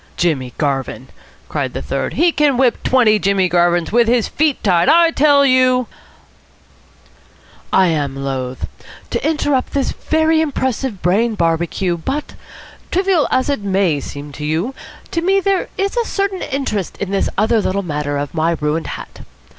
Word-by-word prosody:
"Jimmy 145 Hz, -8 st, 0 dB
Garvin!" 135 Hz, -3 st, -2 dB, 0.4 s
cried -, -, -3 dB
the -, -, -4 dB
third. -, -, -3 dB
"He 345 Hz, +1 st, +3 dB
can 295 Hz, -5 st, +2 dB
whip 255 Hz, -2 st, +2 dB
twenty 230 Hz, -5 st, +3 dB
Jimmy 195 Hz, -1 st, +2 dB
Garvins 175 Hz, 0 st, +1 dB
with 235 Hz, +1 st, +3 dB
his 235 Hz, -1 st, +2 dB
feet 305 Hz, -2 st, 0 dB
tied. 180 Hz, -4 st, +3 dB
I 335 Hz, +1 st, +5 dB
tell 285 Hz, -2 st, +4 dB
you 255 Hz, -1 st, +3 dB, 0.9 s
" -, -, -29 dB
"I 190 Hz, -, +4 dB
am 145 Hz, -4 st, -1 dB
loath," 130 Hz, -2 st, -4 dB
observed -, -, -2 dB
Psmith, -, -, -19 dB
"to -, -, 0 dB
interrupt 290 Hz, -4 st, 0 dB
this 275 Hz, -2 st, 0 dB
very 315 Hz, 0 st, +1 dB
impressive 260 Hz, -, -2 dB
brain 215 Hz, +6 st, +2 dB
barbecue, 170 Hz, +1 st, 0 dB
but, 275 Hz, -, -4 dB, 0.6 s
trivial 370 Hz, -4 st, +2 dB
as 260 Hz, 0 st, +1 dB
it 285 Hz, -4 st, 0 dB
may 190 Hz, -6 st, +1 dB
seem 145 Hz, +1 st, -8 dB
to 150 Hz, -, -8 dB
you, 160 Hz, -, -1 dB, 0.4 s
to 335 Hz, -, -1 dB
me 385 Hz, +3 st, +3 dB
there 390 Hz, -1 st, 0 dB
is 395 Hz, +2 st, -1 dB
a 475 Hz, -1 st, +1 dB
certain 395 Hz, -3 st, -2 dB
interest 260 Hz, -, -3 dB
in 200 Hz, -1 st, -4 dB
this 195 Hz, -, 0 dB
other 220 Hz, +2 st, +2 dB
little 200 Hz, 0 st, -1 dB
matter 150 Hz, -3 st, -3 dB
of 145 Hz, -1 st, -4 dB
my 165 Hz, 0 st, 0 dB
ruined 150 Hz, +2 st, -1 dB
hat. -, -, -8 dB
215 Hz, 170 wpm, -17 LUFS, -, 0.9 s, I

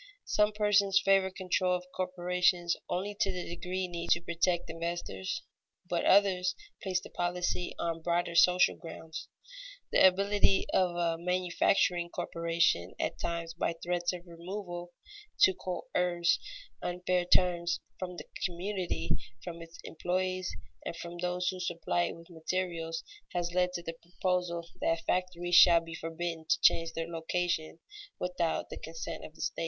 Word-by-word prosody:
Some 210 Hz, 0 st, +3 dB
persons 200 Hz, -2 st, +4 dB
favor 195 Hz, -1 st, +5 dB
control 185 Hz, -1 st, +1 dB
of 180 Hz, 0 st, -4 dB
corporations 180 Hz, -1 st, +1 dB
only 195 Hz, +3 st, -1 dB
to 195 Hz, -, +2 dB
the 180 Hz, -1 st, -4 dB
degree 180 Hz, +2 st, -3 dB
needed 170 Hz, -1 st, +1 dB
to 175 Hz, -, -2 dB
protect 170 Hz, 0 st, 0 dB
investors, 170 Hz, -, -4 dB, 0.4 s
but -, -, 0 dB
others 185 Hz, -3 st, +4 dB, 0.3 s
place 185 Hz, -2 st, 0 dB
the -, -, -12 dB
policy 175 Hz, 0 st, -1 dB
on 165 Hz, -1 st, -2 dB
broader 170 Hz, +1 st, 0 dB
social 180 Hz, +1 st, +5 dB
grounds. 160 Hz, -1 st, -8 dB, 0.6 s
The -, -, +5 dB
ability 200 Hz, +1 st, +3 dB
of 180 Hz, -2 st, +3 dB
a 170 Hz, -1 st, +1 dB
manufacturing 180 Hz, 0 st, +2 dB
corporation, 165 Hz, -, 0 dB
at -, -, -2 dB
times, 170 Hz, -1 st, -3 dB
by 165 Hz, 0 st, -1 dB
threats 175 Hz, +1 st, -1 dB
of 180 Hz, -1 st, -8 dB
removal, 175 Hz, 0 st, -6 dB, 0.5 s
to 190 Hz, -, +8 dB
coerce 180 Hz, -1 st, 0 dB, 0.4 s
unfair 180 Hz, 0 st, 0 dB
terms 175 Hz, -1 st, +3 dB, 0.2 s
from 180 Hz, -1 st, -4 dB
the 155 Hz, -2 st, -8 dB, 0.2 s
community, 180 Hz, -, -2 dB, 0.3 s
from 170 Hz, 0 st, -7 dB
its 165 Hz, 0 st, -11 dB
employees, 185 Hz, +2 st, -1 dB, 0.3 s
and -, -, -4 dB
from 170 Hz, +1 st, -7 dB
those 180 Hz, +1 st, 0 dB
who 185 Hz, -, -4 dB
supply 175 Hz, -1 st, 0 dB
it -, -, -4 dB
with 165 Hz, +1 st, -15 dB
materials, 165 Hz, -1 st, -2 dB, 0.3 s
has 175 Hz, -1 st, -1 dB
led 180 Hz, 0 st, +2 dB
to 175 Hz, -, -4 dB
the 165 Hz, -, -4 dB
proposal 180 Hz, -1 st, -1 dB
that 165 Hz, 0 st, 0 dB
factories 180 Hz, -1 st, -1 dB
shall 170 Hz, -1 st, +9 dB
be 165 Hz, 0 st, -9 dB
forbidden 165 Hz, 0 st, -4 dB
to -, -, +4 dB
change 165 Hz, 0 st, +4 dB
their 165 Hz, 0 st, -3 dB
location 165 Hz, -1 st, -1 dB, 0.4 s
without 180 Hz, -2 st, -1 dB
the -, -, -5 dB
consent 160 Hz, +1 st, -6 dB
of 155 Hz, -, -10 dB
the -, -, -10 dB
state. -, -, -2 dB
175 Hz, 150 wpm, -31 LUFS, 170-180 Hz, 0.6 s, shall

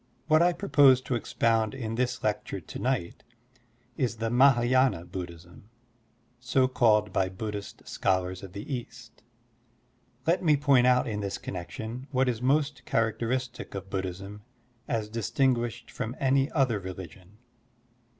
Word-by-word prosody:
What 155 Hz, 0 st, +4 dB
I 175 Hz, +1 st, +5 dB
propose 145 Hz, -8 st, +5 dB
to 130 Hz, -, -4 dB
expound 115 Hz, -1 st, +1 dB
in 115 Hz, -4 st, -4 dB
this 125 Hz, +1 st, -1 dB
lecture -, -, -2 dB
to -, -, -9 dB
night 125 Hz, -9 st, -2 dB, 0.7 s
is 125 Hz, -3 st, 0 dB
the 115 Hz, 0 st, -2 dB
Mah& 135 Hz, +2 st, +6 dB
y^na 120 Hz, -7 st, +2 dB
Buddhism, 90 Hz, +2 st, -9 dB, 0.7 s
so 130 Hz, +1 st, +2 dB
called 105 Hz, -5 st, +3 dB
by 95 Hz, -1 st, +1 dB
Buddhist 105 Hz, +1 st, -7 dB
scholars 95 Hz, -1 st, -1 dB
of 95 Hz, -3 st, -10 dB
the 100 Hz, +8 st, -6 dB
East. 120 Hz, -1 st, -8 dB, 1.0 s
Let 170 Hz, +3 st, +2 dB
me 155 Hz, -4 st, +4 dB
point 135 Hz, -3 st, +4 dB
out 125 Hz, 0 st, +4 dB
in 105 Hz, -2 st, -3 dB
this 100 Hz, -1 st, -3 dB
connection 110 Hz, -, -6 dB
what 130 Hz, -1 st, +1 dB
is 120 Hz, -2 st, -1 dB
most 140 Hz, +1 st, +1 dB
characteristic 120 Hz, +2 st, -1 dB
of 95 Hz, 0 st, -7 dB
Buddhism 95 Hz, +2 st, -5 dB, 0.5 s
as 110 Hz, -2 st, -1 dB
distinguished 120 Hz, +1 st, -1 dB
from 125 Hz, 0 st, -4 dB
any 135 Hz, +1 st, +2 dB
other 130 Hz, -7 st, +1 dB
religion. 95 Hz, +1 st, -10 dB
115 Hz, 140 wpm, -28 LUFS, 100-130 Hz, 1.0 s, Mah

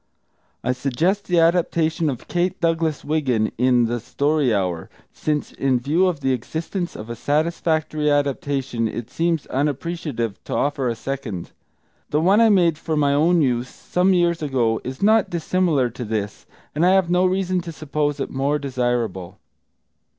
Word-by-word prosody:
I 125 Hz, -, +1 dB
suggest 150 Hz, +10 st, 0 dB
the 175 Hz, -1 st, +3 dB
adaptation 165 Hz, -1 st, +2 dB
of 125 Hz, -4 st, -6 dB
Kate 175 Hz, +1 st, -1 dB
Douglas 165 Hz, -2 st, 0 dB
Wiggin, 130 Hz, -8 st, 0 dB
in 125 Hz, -1 st, +4 dB
The 120 Hz, +1 st, -2 dB
Story 140 Hz, +3 st, 0 dB
Hour, 90 Hz, -5 st, -1 dB, 0.2 s
since 150 Hz, -1 st, -2 dB
in 130 Hz, -2 st, 0 dB
view 155 Hz, +9 st, +2 dB
of 165 Hz, -6 st, -2 dB
the 135 Hz, -1 st, +1 dB
existence 165 Hz, -, -4 dB
of 110 Hz, -, -8 dB
a 120 Hz, -, -5 dB
satisfactory 155 Hz, +1 st, 0 dB
adaptation 140 Hz, -4 st, 0 dB
it 120 Hz, +2 st, -6 dB
seems 165 Hz, 0 st, 0 dB
unappreciative 140 Hz, -, -3 dB
to -, -, -3 dB
offer 140 Hz, -3 st, 0 dB
a 115 Hz, -, -2 dB
second. 125 Hz, -9 st, -5 dB, 0.6 s
The 150 Hz, -, +1 dB
one 195 Hz, +7 st, +4 dB
I 225 Hz, -, +6 dB
made 170 Hz, -6 st, +3 dB
for 160 Hz, -1 st, -2 dB
my 140 Hz, -1 st, +3 dB
own 165 Hz, +3 st, +3 dB
use 125 Hz, -1 st, 0 dB
some 180 Hz, +2 st, 0 dB
years 170 Hz, -1 st, +2 dB
ago 125 Hz, -6 st, 0 dB
is 130 Hz, +7 st, -6 dB
not 220 Hz, 0 st, +4 dB
dissimilar 165 Hz, -6 st, +1 dB
to 125 Hz, -, -6 dB
this, 105 Hz, -2 st, -4 dB, 0.3 s
and 155 Hz, -, 0 dB
I 180 Hz, +1 st, +5 dB
have 190 Hz, -3 st, +2 dB
no 180 Hz, +1 st, +4 dB
reason 185 Hz, -1 st, 0 dB
to 170 Hz, -1 st, -7 dB
suppose 150 Hz, -1 st, -2 dB
it 135 Hz, -, -3 dB
more 140 Hz, +2 st, 0 dB
desirable. 120 Hz, -9 st, -2 dB
145 Hz, 165 wpm, -22 LUFS, 125-170 Hz, 0.6 s, I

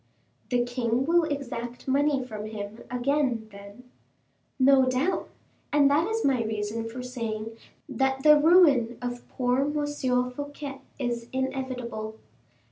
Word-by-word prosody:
"The 245 Hz, -1 st, +2 dB
king 245 Hz, 0 st, 0 dB
will 335 Hz, +1 st, +3 dB
exact 245 Hz, -5 st, -5 dB
money 280 Hz, 0 st, +2 dB
from 215 Hz, -3 st, -6 dB
him 215 Hz, 0 st, -7 dB
again, 250 Hz, -2 st, 0 dB
then?" 200 Hz, +4 st, -12 dB, 0.7 s
"No 265 Hz, -1 st, +5 dB
doubt; 265 Hz, +9 st, 0 dB, 0.4 s
and 285 Hz, -1 st, +5 dB
that 310 Hz, +5 st, +3 dB
is 450 Hz, +1 st, -1 dB
my 255 Hz, -4 st, +2 dB
reason 220 Hz, +1 st, -3 dB
for 250 Hz, +2 st, -7 dB
saying 225 Hz, -3 st, -4 dB, 0.3 s
that 265 Hz, 0 st, 0 dB
the 300 Hz, 0 st, +8 dB
ruin 290 Hz, -8 st, +5 dB
of 245 Hz, 0 st, -5 dB
poor 250 Hz, 0 st, 0 dB
M. 275 Hz, -3 st, 0 dB
Fouquet 285 Hz, 0 st, -7 dB, 0.2 s
is 240 Hz, -3 st, -3 dB
inevitable. 255 Hz, -4 st, -3 dB
255 Hz, 125 wpm, -27 LUFS, 235-280 Hz, 0.7 s, the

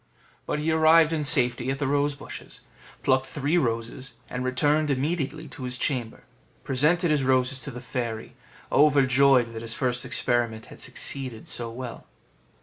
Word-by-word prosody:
But -, -, -1 dB
he 155 Hz, +2 st, 0 dB
arrived 160 Hz, 0 st, +5 dB
in 155 Hz, -2 st, -1 dB
safety 125 Hz, -4 st, +2 dB
at 135 Hz, -, -1 dB
the 145 Hz, -, -2 dB
rose 145 Hz, +1 st, +1 dB
bushes, 140 Hz, -, -10 dB, 0.4 s
plucked 130 Hz, 0 st, +2 dB
three 150 Hz, +3 st, -1 dB
roses, 120 Hz, 0 st, -3 dB, 0.2 s
and 125 Hz, 0 st, -3 dB
returned 145 Hz, +4 st, +1 dB
immediately 150 Hz, +2 st, -2 dB
to 130 Hz, -, -9 dB
his 125 Hz, 0 st, -3 dB
chamber; 120 Hz, -4 st, -2 dB, 0.4 s
presented 155 Hz, +5 st, +2 dB
his 150 Hz, -2 st, +2 dB
roses 130 Hz, 0 st, +2 dB
to -, -, -4 dB
the 125 Hz, -2 st, -8 dB
fairy, 120 Hz, -1 st, -4 dB, 0.4 s
overjoyed 135 Hz, -4 st, +4 dB
that 110 Hz, -, -6 dB
his 115 Hz, 0 st, -7 dB
first 125 Hz, -1 st, -1 dB
experiment 120 Hz, -3 st, 0 dB
had -, -, -14 dB
succeeded 130 Hz, -5 st, -3 dB
so 120 Hz, -1 st, -3 dB
well. 120 Hz, +1 st, -8 dB
130 Hz, 155 wpm, -26 LUFS, 125-145 Hz, 0.4 s, arrived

